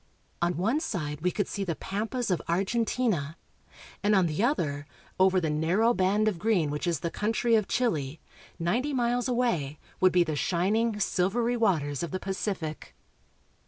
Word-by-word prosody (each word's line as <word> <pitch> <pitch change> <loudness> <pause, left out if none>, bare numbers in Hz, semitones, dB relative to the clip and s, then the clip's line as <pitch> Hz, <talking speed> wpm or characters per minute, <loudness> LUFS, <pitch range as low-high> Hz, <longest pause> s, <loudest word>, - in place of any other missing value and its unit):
On 170 -1 +1
one 225 - +1
side 155 - -4
we 180 - +2
could 205 +2 -1
see 200 - -3
the 170 -4 -2
pampas 215 - -3
of 180 - +1
Argentina, 195 - 0 0.6
and 205 +1 +3
on 190 -2 +4
the 160 +5 -1
other, 145 - 0 0.3
over 190 0 +5
the 160 -3 -1
narrow 180 +10 +2
band 200 +2 +2
of 195 -6 0
green 180 -7 +1
which 150 +4 -3
is 170 -4 0
the 170 - -2
country 225 +2 0
of 215 -3 +3
Chile, 160 - -1 0.4
ninety 240 - 0
miles 245 -1 +1
away, 230 - 0 0.2
would 185 -1 +5
be 180 0 +4
the 155 -2 -3
shining, 205 +8 +1
silvery 215 +6 +1
waters 160 - +1
of 170 - -3
the 185 - -3
Pacific. 190 -5 -4
190 Hz, 165 wpm, -28 LUFS, 165-225 Hz, 0.6 s, over